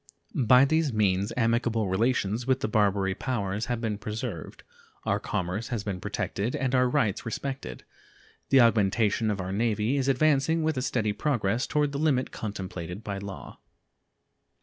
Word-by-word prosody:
By 125 +1 +5
these 160 0 +1
means 100 -1 +1
amicable 115 -2 +1
relations 110 +3 0
with 130 0 +2
the - - 0
Barbary 100 -3 +2
Powers 105 -2 -2
have 120 -2 -1
been 110 -3 -2
preserved, 105 - -6 0.4
our - - +1
commerce 95 +6 -3
has 115 -5 -3
been 95 -3 -4
protected, 105 +5 -2
and 130 -1 -1
our 125 -1 +4
rights 105 -5 0
respected. 115 - -5 0.7
The 135 -1 +6
augmentation 110 -1 +3
of 105 -2 -1
our 90 0 -4
Navy 110 +4 0
is 135 -1 0
advancing 155 +3 +2
with 160 0 +1
a 130 - -1
steady 110 -5 0
progress 115 -2 0
toward 150 -1 +1
the 140 - -3
limit 140 -4 +1
contemplated 95 -2 -6
by 100 -1 -4
law. 100 -1 -9
115 Hz, 155 wpm, -27 LUFS, 100-130 Hz, 0.7 s, The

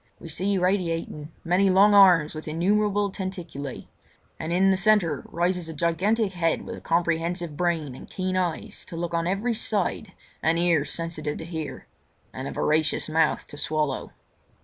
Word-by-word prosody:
We 165 - -9
see 190 +5 +1
radiating 165 -5 -1
many 185 +3 +3
long 200 +3 +6
arms 180 -6 +6
with 155 0 -8
innumerable 205 +5 +1
tentaculae, 175 -9 -6 0.5
and 160 - -4
in 190 +2 +4
the - - +3
centre 195 -7 +2
rises 175 0 -1
a 160 - -7
gigantic 190 +7 +1
head 165 -2 0
with - - -6
a - - -11
comprehensive 170 -1 -1
brain 165 -4 -1
and - - -11
keen 185 0 -2
eyes 185 +4 -2
to 170 - -8
look 170 0 -3
on 165 0 0
every 205 +6 0
side 210 -2 -1 0.3
and 165 +1 +2
ears 170 -4 +2
sensitive 160 -3 -3
to 160 - -7
hear—and 160 -3 -8
a - - -4
voracious 155 0 +1
mouth 160 0 +1
to 145 - -11
swallow. 150 -3 -1
170 Hz, 160 wpm, -25 LUFS, 160-190 Hz, 0.5 s, long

